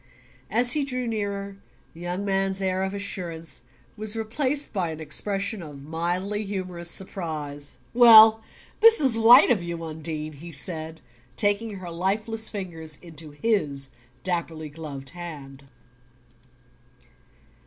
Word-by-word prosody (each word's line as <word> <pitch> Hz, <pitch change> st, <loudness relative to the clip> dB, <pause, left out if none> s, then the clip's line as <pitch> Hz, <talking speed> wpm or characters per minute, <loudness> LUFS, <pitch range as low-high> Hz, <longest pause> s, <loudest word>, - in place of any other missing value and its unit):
As 245 Hz, +2 st, +2 dB
he 295 Hz, +2 st, +2 dB
drew 255 Hz, -2 st, -2 dB
nearer, 200 Hz, -3 st, -3 dB, 0.4 s
the 165 Hz, -, -14 dB
young 175 Hz, +3 st, -3 dB
man's 195 Hz, -1 st, 0 dB
air 190 Hz, -1 st, 0 dB
of 190 Hz, +1 st, -2 dB
assurance 170 Hz, -5 st, -3 dB, 0.3 s
was 215 Hz, 0 st, -3 dB
replaced 260 Hz, +6 st, -1 dB
by 185 Hz, -5 st, -1 dB
an 160 Hz, -1 st, -6 dB
expression 195 Hz, +6 st, -1 dB
of 145 Hz, -4 st, -10 dB
mildly 175 Hz, +7 st, -2 dB
humorous 185 Hz, -4 st, -5 dB
surprise. 155 Hz, -7 st, -5 dB, 0.2 s
"Well 225 Hz, -2 st, +9 dB, 0.4 s
this 455 Hz, +1 st, +7 dB
is 265 Hz, -5 st, +6 dB
white 230 Hz, +3 st, +8 dB
of 215 Hz, -7 st, +2 dB
you. 170 Hz, -1 st, -5 dB
Undine!" 155 Hz, -1 st, -5 dB
he 165 Hz, +4 st, -10 dB
said, 160 Hz, +1 st, -6 dB, 0.3 s
taking 205 Hz, +1 st, +1 dB
her 180 Hz, -3 st, -7 dB
lifeless 215 Hz, +6 st, -1 dB
fingers 165 Hz, -7 st, -6 dB
into 160 Hz, -2 st, -8 dB
his 145 Hz, -5 st, -1 dB, 0.3 s
dapperly 165 Hz, -3 st, -2 dB
gloved 145 Hz, -3 st, -8 dB
hand. 145 Hz, -6 st, -9 dB
185 Hz, 125 wpm, -25 LUFS, 160-215 Hz, 0.4 s, Well